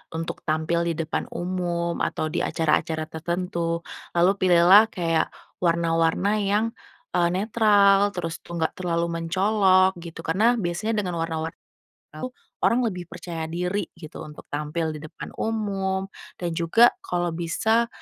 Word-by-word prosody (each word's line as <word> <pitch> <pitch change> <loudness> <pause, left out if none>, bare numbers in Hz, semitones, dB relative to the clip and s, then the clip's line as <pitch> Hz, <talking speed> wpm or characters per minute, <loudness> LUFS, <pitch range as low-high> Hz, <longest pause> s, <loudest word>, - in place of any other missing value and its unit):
untuk 165 0 -4
tampil 160 +2 +1
di 170 - +1
depan 160 0 -2
umum 175 -1 -2
atau 155 - -1
di - - -1
acara-acara 160 0 0
tertentu, 170 0 -2 0.3
lalu 175 +2 +5
pilihlah 185 +4 +7
kayak 165 -2 +1 0.3
warna-warna 170 +4 +2
yang, 205 +2 +1 0.5
eee, 175 -1 +3
netral, 205 -1 +4
terus 165 -2 -4
tuh 170 - -9
nggak 160 - +1
terlalu 170 -2 0
mencolok 190 +1 +3
gitu. 165 -1 -8
Karena 215 +10 +3
biasanya 215 +2 -1
dengan 180 -2 -3
warna-warna 165 0 -3 0.6
itu 255 0 -5 0.3
orang 245 +2 +4
lebih 185 -7 -2
percaya 170 -1 -6
diri 180 +4 -2
gitu, 165 -2 -10
untuk 150 0 -11
tampil 155 +2 -2
di 155 - -6
depan 155 0 -9
umum 195 -3 -1 0.3
dan 175 -1 -1
juga 200 +9 +5
kalau 175 -1 -1
bisa 220 +8 +1
175 Hz, 135 wpm, -25 LUFS, 165-195 Hz, 0.6 s, pilihlah